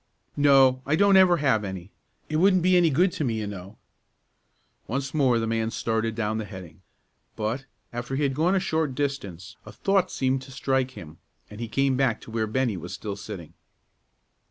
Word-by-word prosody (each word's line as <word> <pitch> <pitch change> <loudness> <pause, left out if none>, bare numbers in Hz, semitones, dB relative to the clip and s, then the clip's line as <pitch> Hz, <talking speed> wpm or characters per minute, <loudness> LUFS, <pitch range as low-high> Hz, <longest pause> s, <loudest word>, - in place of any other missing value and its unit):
"No; 135 -3 +5
I 145 +3 +1
don't 200 +3 +4
ever 185 -2 +6
have 130 -8 +2
any. 95 -1 -7 0.4
It 155 - -1
wouldn't 185 +1 +4
be 185 0 +4
any 175 -2 +5
good 175 +6 +3
to 155 - -3
me, 120 -5 0
you 110 -1 -3
know." 100 0 -8 1.1
Once 135 +3 -3
more 135 -6 +3
the 115 - -1
man 115 0 -1
started 115 -1 -1
down 110 -1 -1
the 110 - -4
heading, 95 -5 -11 0.5
but, 115 +6 -3 0.3
after 120 +2 -4
he 145 - 0
had 140 -1 +1
gone 165 +7 +2
a - - +3
short 160 -7 -1
distance, 135 - -4
a - - -11
thought 195 -2 +1
seemed 130 0 0
to 135 0 -12
strike 130 -1 -1
him, 80 -1 -11 0.3
and 105 +2 -9
he 115 - -3
came 135 +2 +1
back 130 -5 +1
to - - -12
where 110 -1 -1
Bennie 120 -2 0
was 90 +1 -7
still 100 +3 -5
sitting. 100 -5 -9
130 Hz, 195 wpm, -25 LUFS, 110-145 Hz, 1.1 s, ever